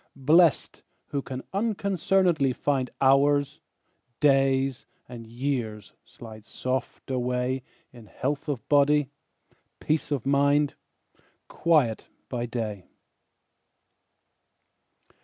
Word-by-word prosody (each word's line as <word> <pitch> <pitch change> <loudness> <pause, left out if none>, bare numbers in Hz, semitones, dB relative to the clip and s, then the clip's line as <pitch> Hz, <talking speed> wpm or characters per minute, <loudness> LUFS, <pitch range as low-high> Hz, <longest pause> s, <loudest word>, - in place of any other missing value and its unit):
Blest, 155 +4 +3 0.3
who 140 - -2
can 130 -1 -7
unconcern'dly 190 - +1
find 135 -3 -1
Hours, 140 +1 +3 0.6
days, 135 -2 +2 0.2
and 120 -2 -10
years, 120 -4 -4
slide 110 -2 -13
soft 130 +1 -4
away 125 +1 -1 0.3
In 120 -3 -14
health 140 +8 -3
of 135 -6 -4
body, 145 -1 +3 0.7
peace 155 0 -1
of 140 -5 -2
mind, 140 +1 +2 0.7
Quiet 150 -10 +1 0.2
by 120 -1 -3
day. 110 -5 -5
135 Hz, 85 wpm, -26 LUFS, 125-145 Hz, 0.7 s, Blest